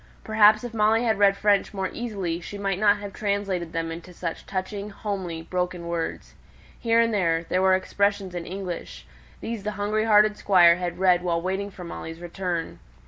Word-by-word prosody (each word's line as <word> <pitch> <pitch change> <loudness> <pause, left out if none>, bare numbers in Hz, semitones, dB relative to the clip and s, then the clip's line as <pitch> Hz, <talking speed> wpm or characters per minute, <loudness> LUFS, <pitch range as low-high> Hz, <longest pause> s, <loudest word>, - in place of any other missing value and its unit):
Perhaps 215 0 +5
if 240 -2 -6
Molly 220 +1 +3
had 220 -4 +1
read 200 -1 +5
French 205 0 +2
more 190 -1 -1
easily 195 -8 -3
she 205 - -7
might 195 -2 -2
not 205 0 +4
have 205 -1 -8
translated 200 -5 -2
them 165 0 -3
into 170 +2 -9
such 170 -1 -5
touching, 200 +2 -4
homely, 190 -5 -5
broken 180 -1 -3
words. 170 -1 -4 0.5
Here 230 -1 +2
and 230 -1 +3
there, 165 -5 +1
there 185 - +1
were 190 0 +5
expressions 200 0 0
in 175 -1 -5
English; 185 -2 -6 0.4
these 230 -2 -4
the 210 +1 -3
hungry 210 +2 0
hearted 210 -1 +5
Squire 175 -3 +5
had 180 -1 -4
read 180 -2 +4
while 170 -2 0
waiting 190 +3 -2
for 185 -2 -10
Molly's 165 -1 -7
return. 175 -1 -4
195 Hz, 185 wpm, -25 LUFS, 175-210 Hz, 0.5 s, Perhaps